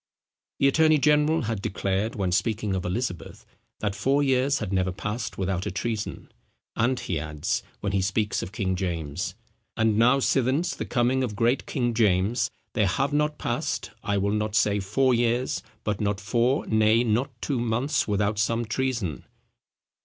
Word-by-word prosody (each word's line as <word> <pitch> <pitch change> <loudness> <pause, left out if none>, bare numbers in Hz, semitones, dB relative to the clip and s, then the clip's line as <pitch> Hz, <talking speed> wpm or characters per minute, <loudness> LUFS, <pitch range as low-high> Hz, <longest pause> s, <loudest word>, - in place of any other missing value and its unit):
The 140 - +4
attorney 155 +2 +4
general 150 +2 +3
had 110 -3 -2
declared, 100 +3 -1
when 95 -3 -1
speaking 105 +1 0
of 95 -1 -2
Elizabeth, 90 -1 -4 0.4
that 105 -2 0
four 140 +7 +1
years 135 +1 +2
had 100 -3 -4
never 95 -1 +1
passed 105 +5 -4
without 95 -1 -1
a - - -2
treason: 110 +2 -4 0.4
and 125 +3 +1
he 90 -8 -2
adds, 75 0 -2 0.2
when 100 - -1
he 95 -1 +1
speaks 105 +2 0
of 90 - -6
King 95 -3 -1
James, 85 -3 -3 0.4
"and 110 -1 +2
now 125 +4 +5
since 135 +5 +1
the - - -5
coming 130 +2 +1
of 110 -5 -3
great 120 +4 +1
King 120 -4 0
James, 105 0 +2 0.2
there 105 -4 +2
have 135 +9 0
not 150 0 +1
passed, - - -2
I 100 -1 0
will 100 +1 +1
not 105 0 -1
say 105 -1 +3
four 125 +7 +2
years, 120 +2 +1 0.2
but 105 -1 -2
not 100 -1 0
four, 120 +7 +1
nay 110 +1 +3
not 120 +2 -1
two 135 -1 -1
months, 120 +5 0
without 105 0 0
some 115 +3 +1
treason." 115 - -2
110 Hz, 170 wpm, -26 LUFS, 100-130 Hz, 0.4 s, now